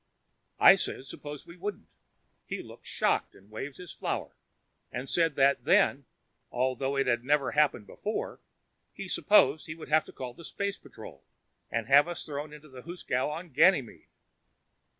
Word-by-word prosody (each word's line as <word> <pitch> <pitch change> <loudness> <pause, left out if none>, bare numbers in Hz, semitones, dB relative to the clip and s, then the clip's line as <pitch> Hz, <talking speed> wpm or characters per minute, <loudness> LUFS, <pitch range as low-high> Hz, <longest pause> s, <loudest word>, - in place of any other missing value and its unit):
I - - +9
said 130 - -3
suppose 145 +1 -8
we 170 +1 -13
wouldn't. 205 +3 -5 0.6
He - - -4
looked - - -14
shocked - - 0
and 100 +3 -20
waved 135 +6 -6
his 180 -1 -9
flower - - -4 0.6
and 125 +2 -5
said 165 -2 +2
that 140 0 +3
then, - - +3 0.5
although 130 +2 -1
it 135 - +2
had 120 -1 +1
never 140 0 +2
happened 145 -7 +2
before, 215 - -4 0.6
he - - -6
supposed 155 -8 +4
he 160 - -6
would 160 - -11
have 155 +1 +3
to - - -12
call 125 -2 -7
the 170 - -13
space 200 +4 -3
patrol - - -12 0.5
and 115 0 -2
have 140 +5 +6
us 175 -1 -5
thrown 145 0 -5
into 150 0 -12
the 130 -3 -11
hoosegow 155 -6 -2
on 165 +4 -6
Ganymede. 140 - +3
145 Hz, 165 wpm, -29 LUFS, 130-165 Hz, 0.6 s, I